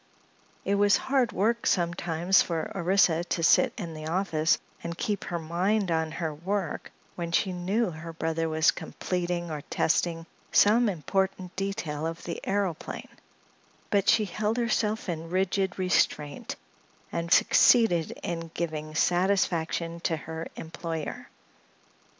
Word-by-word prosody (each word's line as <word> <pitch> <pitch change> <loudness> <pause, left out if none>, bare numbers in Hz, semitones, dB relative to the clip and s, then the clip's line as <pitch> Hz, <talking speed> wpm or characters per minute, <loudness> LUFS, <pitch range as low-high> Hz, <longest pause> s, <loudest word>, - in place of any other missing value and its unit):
It 200 - +1
was 205 0 +4
hard 260 -3 +1
work 230 +4 0
sometimes 175 0 +2
for 165 -2 -2
Orissa 175 -2 +3
to 170 -1 -2
sit 255 +9 +5
in 170 -7 -5
the 155 0 -7
office 165 -2 +1 0.3
and 170 0 -5
keep 205 -3 -2
her 175 - -2
mind 180 +4 0
on 160 -1 0
her 160 -2 -3
work 185 +3 -3 0.2
when 170 -1 -4
she 185 +2 +1
knew 190 +4 0
her 160 +1 -8
brother 165 0 -1
was 160 0 +4
completing 175 -2 -3
or 150 -1 -4
testing 165 0 +1 0.3
some 225 +3 +5
important 185 +2 -2
detail 185 -6 -3
of 165 +1 -6
the 170 - -5
aëroplane, 195 -5 -2 0.8
but 200 -1 +3
she 215 - +4
held 210 +4 -1
herself 225 -2 0
in 165 -2 -4
rigid 190 +1 0
restraint 180 -6 0 0.6
and 170 0 -3
succeeded 185 -10 +5
in 165 -1 -4
giving 155 -2 -4
satisfaction 175 -2 +1
to 170 -1 -1
her 160 +2 -6
employer. 165 -1 -5
175 Hz, 130 wpm, -28 LUFS, 165-195 Hz, 0.8 s, sit